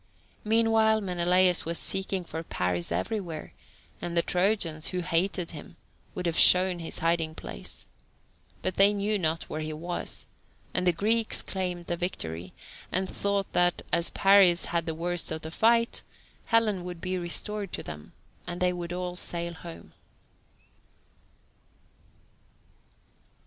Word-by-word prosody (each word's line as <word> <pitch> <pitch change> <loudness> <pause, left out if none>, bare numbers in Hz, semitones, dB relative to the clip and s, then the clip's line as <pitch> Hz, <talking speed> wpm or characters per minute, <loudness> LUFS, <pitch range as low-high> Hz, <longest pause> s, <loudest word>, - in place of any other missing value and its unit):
Meanwhile 220 0 +3
Menelaus 180 -1 +3
was 170 +1 -2
seeking 190 -1 -2
for 160 -1 -6
Paris 90 - -2
everywhere, 185 -8 -3 0.5
and 170 0 -3
the 170 - +4
Trojans, 180 -4 +1
who 180 -1 -1
hated 175 +1 0
him, 170 +4 -10 0.4
would 180 - -4
have 165 -1 0
shown 180 -1 +7
his 165 - -4
hiding 165 -1 0
place. 60 +1 -7 0.8
But 185 -1 -1
they 200 +1 +6
knew 205 +1 0
not 160 -2 0
where 155 - -5
he 155 0 -4
was, 170 +3 -3 0.5
and 180 0 +1
the - - +7
Greeks 220 +6 +1
claimed 180 -2 -3
the 175 - -2
victory, 90 - -4 0.4
and 190 +1 +2
thought 200 0 -2
that, 175 0 +2
as 170 0 +4
Paris 195 -3 +5
had 170 -1 -2
the 160 - -2
worst 175 +1 -1
of 160 0 -4
the 160 - -6
fight, 230 +5 +2 0.5
Helen 215 -5 +2
would 180 -1 -7
be 185 +1 -3
restored 195 +3 -2
to - - -4
them, 75 -1 -9 0.3
and 175 0 -4
they 180 0 +2
would 175 -1 -5
all 180 0 -4
sail 170 -1 -3
home. 165 +1 -11
175 Hz, 140 wpm, -28 LUFS, 165-195 Hz, 0.8 s, shown